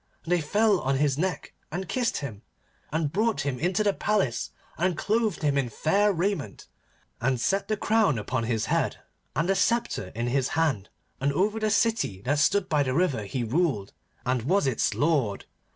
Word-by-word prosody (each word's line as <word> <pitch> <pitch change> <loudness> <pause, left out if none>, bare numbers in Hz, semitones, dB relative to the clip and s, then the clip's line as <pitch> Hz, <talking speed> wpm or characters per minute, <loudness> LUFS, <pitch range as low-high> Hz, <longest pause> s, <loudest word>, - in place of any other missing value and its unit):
And 170 - -6
they 175 -1 +3
fell 205 +5 +2
on 135 0 0
his 140 -1 +2
neck 180 +4 -2 0.2
and 180 +3 -4
kissed 250 -3 0
him, 115 -8 -6 0.5
and 155 -1 0
brought 220 +3 +1
him 135 -3 -2
into 185 +5 +1
the 205 -1 +2
palace 195 - 0 0.3
and 175 0 0
clothed 215 -5 0
him 140 -2 +2
in 130 -3 -1
fair 200 - +2
raiment, 185 - -2 0.6
and 130 +1 +1
set 195 +10 0
the 215 - 0
crown 210 - +2
upon 115 +3 -2
his 115 -2 0
head, - - 0 0.4
and 165 - +1
the 195 - +3
sceptre 195 - 0
in 115 +1 -2
his 130 +1 +1
hand, 140 -12 +1 0.3
and 140 +1 +1
over 205 +7 +1
the 215 0 +1
city 205 - +1
that 145 +3 +1
stood 190 +5 +3
by 150 -2 +2
the 130 -2 0
river 140 - +1
he 120 +5 -3
ruled, 120 - 0 0.3
and 125 0 +1
was 180 - +2
its 130 -4 +1
lord. 140 -10 +1
155 Hz, 185 wpm, -27 LUFS, 130-200 Hz, 0.6 s, they